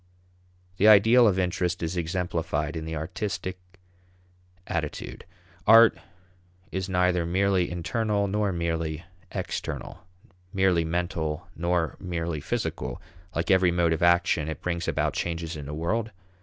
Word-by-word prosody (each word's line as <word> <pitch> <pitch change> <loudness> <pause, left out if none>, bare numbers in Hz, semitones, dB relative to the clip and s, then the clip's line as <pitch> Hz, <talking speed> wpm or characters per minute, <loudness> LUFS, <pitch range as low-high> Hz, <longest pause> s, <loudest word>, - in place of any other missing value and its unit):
The 105 - +4
ideal 110 +3 +7
of 95 -3 +2
interest 90 -1 -1
is 80 +2 -2
exemplified 85 -3 -2
in 80 -1 -4
the 80 0 -4
artistic 90 +3 -4 1.1
attitude. 80 -4 -4 0.4
Art 115 +1 +8 0.8
is 95 0 -3
neither 90 -1 +2
merely 95 +1 +1
internal 100 +5 -1
nor 105 0 0
merely 85 -2 -2 0.3
external; - - -5 0.5
merely 95 -3 +2
mental 80 -2 -2
nor 85 -3 0
merely 85 -3 -3
physical. 65 -2 -3 0.4
Like 85 +3 0
every 95 -1 +5
mode 85 -1 +2
of 80 - -3
action, 85 -3 +3
it 80 - -6
brings 85 -1 -2
about - - 0
changes 85 -1 -3
in 75 -2 -7
the 75 - -5
world. 105 +8 -1
85 Hz, 130 wpm, -26 LUFS, 80-95 Hz, 1.1 s, Art